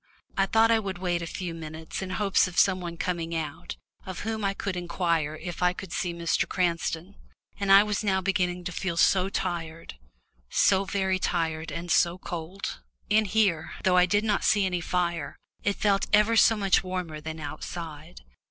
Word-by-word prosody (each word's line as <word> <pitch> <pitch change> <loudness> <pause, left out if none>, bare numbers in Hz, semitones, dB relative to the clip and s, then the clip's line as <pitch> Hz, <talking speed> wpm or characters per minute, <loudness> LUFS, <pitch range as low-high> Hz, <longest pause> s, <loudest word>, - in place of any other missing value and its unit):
I 195 0 +2
thought 225 +3 +4
I 225 - +4
would 195 -4 -4
wait 175 -1 -1
a 170 - -4
few 175 0 -5
minutes 160 +1 -7
in 190 - -4
hopes 195 0 +2
of 175 -1 -9
some 185 0 +4
one 170 -1 -6
coming 170 -2 -2
out, 155 -3 -5 0.3
of 185 -2 -6
whom 220 0 -3
I 195 0 0
could 195 -2 -3
inquire 170 -3 -1
if 175 +3 -7
I 180 0 +3
could 185 -1 -8
see 180 -4 -1
Mr. 170 0 0
Cranston. 175 0 -1 0.5
And 200 -1 +1
I 195 +1 +9
was 210 0 -2
now 190 -2 +2
beginning 180 -2 0
to 180 - -4
feel 175 -1 -3
so 185 +2 +4
tired 165 -4 -4 0.5
so 195 0 +3
very 190 -1 0
tired, 165 -3 -1
and 170 0 -4
so 170 0 +3
cold. 175 +2 -6 0.3
In 215 +1 +4
here, 195 -5 +1
though 185 -1 +4
I 180 0 +5
did 205 +3 +2
not 210 -2 +1
see 205 -3 +3
any 180 -2 -1
fire, 170 -3 -1 0.3
it 205 -1 +1
felt 200 -2 +1
ever 210 +2 +4
so 225 0 +5
much 195 -2 +3
warmer 180 -4 -4
than 160 +1 -6
outside. 150 - -7
180 Hz, 190 wpm, -27 LUFS, 170-195 Hz, 0.5 s, I